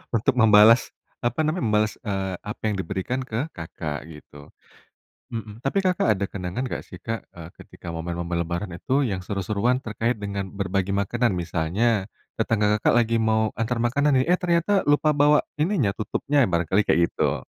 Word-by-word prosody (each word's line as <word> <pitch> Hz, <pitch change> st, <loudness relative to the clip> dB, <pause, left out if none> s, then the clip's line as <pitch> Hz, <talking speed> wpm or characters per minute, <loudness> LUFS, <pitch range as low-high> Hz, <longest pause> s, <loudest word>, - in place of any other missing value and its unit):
untuk 115 Hz, -, +2 dB
membalas, 110 Hz, 0 st, +6 dB, 0.3 s
apa 120 Hz, +2 st, -1 dB
namanya, 155 Hz, +1 st, -1 dB
membalas, 105 Hz, 0 st, +2 dB
eee, 95 Hz, -3 st, -2 dB
apa 105 Hz, -, -7 dB
yang 105 Hz, -, 0 dB
diberikan 95 Hz, +6 st, -3 dB
ke 125 Hz, +4 st, -3 dB
Kakak 80 Hz, -2 st, -5 dB
gitu. 75 Hz, -2 st, -13 dB, 0.8 s
Mhm, 110 Hz, 0 st, -7 dB
tapi 135 Hz, +9 st, 0 dB
Kakak 185 Hz, -10 st, +1 dB
ada 100 Hz, -, -1 dB
kenangan 95 Hz, +7 st, -4 dB
nggak -, -, -4 dB
sih 90 Hz, -, -11 dB
Kak, 115 Hz, 0 st, -4 dB
eee, 85 Hz, -2 st, -10 dB
ketika -, -, -12 dB
momen-momen 85 Hz, +1 st, -3 dB
lebaran 85 Hz, +2 st, -4 dB
itu 135 Hz, +10 st, 0 dB
yang 95 Hz, -5 st, -3 dB
seru-seruan 105 Hz, +5 st, 0 dB
terkait 115 Hz, 0 st, -2 dB
dengan 100 Hz, -1 st, -3 dB
berbagi 95 Hz, -1 st, -1 dB
makanan? 100 Hz, +4 st, +1 dB
Misalnya, 90 Hz, +5 st, 0 dB, 0.3 s
tetangga 105 Hz, -1 st, +2 dB
Kakak -, -, +2 dB
lagi 115 Hz, -1 st, +2 dB
mau 110 Hz, -1 st, +2 dB
antar 115 Hz, +2 st, -1 dB
makanan 140 Hz, +5 st, +2 dB
nih, 130 Hz, -, 0 dB
eh 180 Hz, +1 st, +4 dB
ternyata 180 Hz, +3 st, +2 dB
lupa 145 Hz, +1 st, +3 dB
bawa 145 Hz, +1 st, +5 dB, 0.2 s
ininya 155 Hz, -, +2 dB
tutupnya 140 Hz, +5 st, +1 dB
barangkali 90 Hz, +1 st, +1 dB
kayak 85 Hz, -, +3 dB
gitu. -, -, -1 dB
105 Hz, 165 wpm, -24 LUFS, 95-125 Hz, 0.8 s, membalas